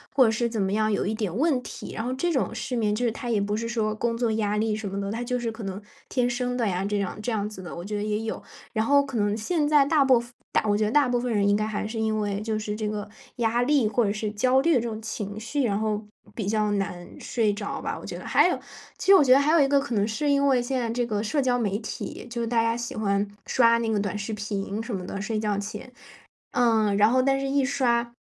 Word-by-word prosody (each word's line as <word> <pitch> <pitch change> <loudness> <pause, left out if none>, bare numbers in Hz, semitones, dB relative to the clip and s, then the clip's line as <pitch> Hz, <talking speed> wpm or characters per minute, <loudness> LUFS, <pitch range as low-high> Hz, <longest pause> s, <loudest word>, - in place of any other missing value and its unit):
或 265 - +7
者 225 - +3
是 235 +2 0
怎 225 -3 -2
么 190 0 0
样 215 0 +2
有 200 - 0
一 215 - -1
点 210 -5 -3
问 280 -1 +2
题， - - -8
然 225 - -3
后 255 - -1
这 345 +6 0
种 270 - 0
失 265 -2 -3
眠 215 -3 +1
就 235 +4 -1
是 230 - +2
他 240 +2 -6
也 215 -3 +2
不 205 +1 -1
是 230 +1 -3
说 220 -2 -1
工 230 +1 -1
作 235 -2 +1
压 210 -1 0
力 215 0 +1
什 215 -1 -5
么 195 +1 -4
的， 200 0 -3
他 230 +3 -3
就 250 0 -1
是 235 -1 -2
可 220 -1 -9
能 195 +1 -5 0.3
天 245 -1 +1
生 245 0 -2
的 235 -3 0
呀 190 0 -1
这 205 0 0
样 200 +2 -3
这 245 - -2
样 210 -2 -1
子 190 -3 -9
的， 175 - -7
我 170 - -6
觉 210 +1 -3
得 205 - -2
也 210 0 -1
有。 225 - -4 0.3
然 220 -1 +1
后 280 +1 +5
可 270 -4 -5
能 205 0 +1
现 295 +7 0
在 295 -2 +5
大 295 -1 +4
部 255 -3 +5
分 240 0 -10 0.3
我 205 -1 +2
觉 215 - +1
得 - - 0
大 290 -1 +4
部 245 -1 +1
分 245 0 -2
人 200 -1 +2
应 205 - +4
该 215 - 0
还 210 -1 -3
是 225 +1 -4
因 220 -1 0
为 205 -1 -1
就 220 0 -2
是 210 -1 -3
这 215 -1 -3
个 210 -1 -4 0.3
压 235 0 +1
力 280 -4 +3
或 235 +3 +1
者 200 - +1
是 215 -1 -3
焦 255 +5 +3
虑 335 +2 +3
这 245 - +3
种 225 -2 -4
情 215 -2 -5
绪， 255 +6 -2
然 205 -3 +1
后 215 -1 -1 0.3
比 215 - -4
较 210 0 +1
难 180 -3 -3
睡 220 -4 0
着 205 0 -4
吧， - - -3
我 - - -12
觉 - - -6
得。 - - -10
还 - - +4
有， - - 0 0.4
其 - - -6
实 - - +10
我 370 - +7
觉 260 - +3
得 265 - +8
还 290 +2 +2
有 325 -2 +5
一 275 - +4
个 280 0 +4
可 275 -3 -4
能 205 -2 +2
是 260 +7 -2
因 280 0 +3
为 260 -2 +4
现 255 +2 -1
在 235 -2 -2
这 240 +1 0
个 210 -3 -1
社 280 +6 0
交 250 -1 +2
媒 205 -3 0
体， 220 - -6
就 235 0 -3
是 230 - -1
大 235 0 +2
家 230 0 +1
喜 235 0 -5
欢 200 -1 0 0.2
刷 230 -2 +4
那 230 - -1
个 215 - +1
短 200 0 -2
视 210 +2 -4
频 205 0 -3
什 225 -2 -4
么 180 -1 -5
的， 195 - -5
睡 215 0 -2
觉 210 -2 0
前， 210 +5 -7 0.6
呃， 225 -4 +3
然 205 +2 +5
后 255 +2 +3
但 270 0 +2
是 275 - -2
一 275 0 +2
刷 240 -3 +1
225 Hz, 315 characters per minute, -26 LUFS, 210-245 Hz, 0.6 s, 实